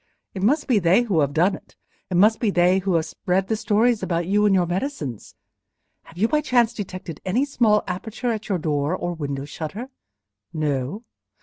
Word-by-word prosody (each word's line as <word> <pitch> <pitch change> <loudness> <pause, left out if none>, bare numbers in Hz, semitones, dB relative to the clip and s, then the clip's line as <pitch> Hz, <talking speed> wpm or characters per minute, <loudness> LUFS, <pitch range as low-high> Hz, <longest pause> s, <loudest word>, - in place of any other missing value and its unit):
It 190 - -5
must 285 +9 +2
be 240 -6 +3
they 185 +6 +4
who 200 -9 0
have 140 -2 +2
done 175 +7 +2
it—it 185 - -11
must 215 +4 +5
be 225 - +1
they 180 0 +3
who 190 -2 0
have 160 -1 +1
spread 185 +4 -1
the 220 - 0
stories 220 +2 +2
about 170 -1 -1
you 205 +3 +3
and 195 - +4
your 180 -2 +3
medicines. 175 - -4 0.7
Have 170 - -16
you 215 +5 +2
by 300 +4 +1
chance 240 -5 +2
detected 185 -5 -7
any 235 +9 +1
small 225 -7 +2
aperture 220 +6 -3
in 220 - -3
your 195 - +1
door, 150 0 -1
or 175 -1 -3
window 140 -4 -4
shutter? 180 - -6 0.6
No? 150 - -2
190 Hz, 190 wpm, -23 LUFS, 165-220 Hz, 0.7 s, must